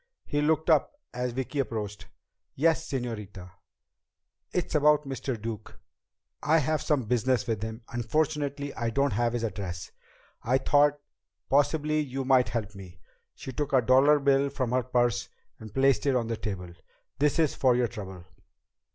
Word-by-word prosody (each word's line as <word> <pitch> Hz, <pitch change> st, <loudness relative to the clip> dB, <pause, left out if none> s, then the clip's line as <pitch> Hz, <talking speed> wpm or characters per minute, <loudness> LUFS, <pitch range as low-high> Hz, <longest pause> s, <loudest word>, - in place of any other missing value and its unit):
He 145 Hz, -, -1 dB
looked 155 Hz, +1 st, +1 dB
up 160 Hz, -, +3 dB, 0.2 s
as 125 Hz, 0 st, -2 dB
Vicki 130 Hz, +3 st, -3 dB
approached. 105 Hz, -6 st, -3 dB, 0.5 s
"Yes, 160 Hz, +2 st, +1 dB
señorita?" 105 Hz, -8 st, -5 dB, 1.0 s
"It's 180 Hz, -, -2 dB
about 150 Hz, 0 st, +4 dB
Mr. 130 Hz, -3 st, -4 dB
Duke. 110 Hz, -1 st, -7 dB, 0.6 s
I 155 Hz, +2 st, +3 dB
have 155 Hz, 0 st, 0 dB
some 145 Hz, -4 st, +1 dB
business 125 Hz, +3 st, +1 dB
with 110 Hz, -4 st, -2 dB
him. 110 Hz, +2 st, -6 dB
Unfortunately 145 Hz, +3 st, -1 dB
I 115 Hz, -1 st, -2 dB
don't 140 Hz, +2 st, +1 dB
have 120 Hz, +2 st, +1 dB
his 120 Hz, -1 st, -2 dB
address. 95 Hz, -5 st, -5 dB, 0.5 s
I 125 Hz, +3 st, +2 dB
thought 145 Hz, +2 st, +3 dB, 0.5 s
possibly 150 Hz, +2 st, +2 dB
you 135 Hz, -2 st, -3 dB
might 130 Hz, -1 st, +4 dB
help 110 Hz, -3 st, -3 dB
me." 90 Hz, -4 st, -12 dB, 0.4 s
She 130 Hz, -, -7 dB
took 145 Hz, +2 st, -3 dB
a 130 Hz, -, +5 dB
dollar 135 Hz, +5 st, +5 dB
bill 140 Hz, 0 st, +2 dB
from 130 Hz, -3 st, -2 dB
her 130 Hz, 0 st, +2 dB
purse 120 Hz, -2 st, 0 dB, 0.3 s
and 110 Hz, -1 st, -10 dB
placed 135 Hz, +3 st, +2 dB
it 135 Hz, -, +3 dB
on 120 Hz, -2 st, +1 dB
the 115 Hz, 0 st, -2 dB
table. 90 Hz, -5 st, -5 dB, 0.5 s
"This 145 Hz, +2 st, +2 dB
is 160 Hz, -3 st, +2 dB
for 130 Hz, -2 st, +3 dB
your 125 Hz, -1 st, +2 dB
trouble." 95 Hz, -6 st, -9 dB
130 Hz, 160 wpm, -28 LUFS, 115-145 Hz, 1.0 s, a